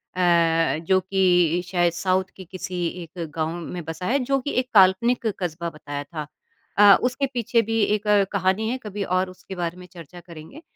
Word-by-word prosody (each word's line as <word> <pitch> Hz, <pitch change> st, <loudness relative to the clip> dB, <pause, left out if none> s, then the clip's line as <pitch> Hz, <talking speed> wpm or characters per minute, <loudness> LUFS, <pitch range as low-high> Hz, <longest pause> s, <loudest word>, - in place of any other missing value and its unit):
अ, 170 Hz, -3 st, +2 dB
जो 190 Hz, +2 st, +3 dB
कि 180 Hz, -3 st, +2 dB
शायद 175 Hz, -2 st, +1 dB
साउथ 185 Hz, +2 st, +1 dB
के 190 Hz, -, -10 dB
किसी 180 Hz, 0 st, -5 dB, 0.2 s
एक 170 Hz, +1 st, -8 dB
गाँव 160 Hz, -1 st, -1 dB, 0.2 s
में 175 Hz, +1 st, -6 dB
बसा 165 Hz, +3 st, -6 dB
है 275 Hz, +6 st, +1 dB
जो 275 Hz, +2 st, +1 dB
कि 285 Hz, +3 st, -4 dB
एक 255 Hz, 0 st, -3 dB
काल्पनिक 205 Hz, +5 st, +4 dB
कस्बा 170 Hz, -1 st, -3 dB
बताया 145 Hz, -2 st, -7 dB
था। 150 Hz, 0 st, -7 dB, 0.5 s
अ, 205 Hz, -1 st, +8 dB
उसके 255 Hz, +3 st, 0 dB
पीछे 235 Hz, -1 st, +1 dB
भी 225 Hz, +1 st, -2 dB
एक 210 Hz, 0 st, 0 dB, 0.2 s
कहानी 195 Hz, +2 st, 0 dB
है, 255 Hz, -, -2 dB
कभी 205 Hz, -1 st, -4 dB
और 185 Hz, 0 st, 0 dB
उसके 185 Hz, +1 st, -11 dB
बारे 175 Hz, -1 st, -3 dB
में 180 Hz, -, -11 dB
चर्चा 175 Hz, -1 st, -12 dB
करेंगे। 170 Hz, -, -12 dB
185 Hz, 185 wpm, -23 LUFS, 170-205 Hz, 0.5 s, अ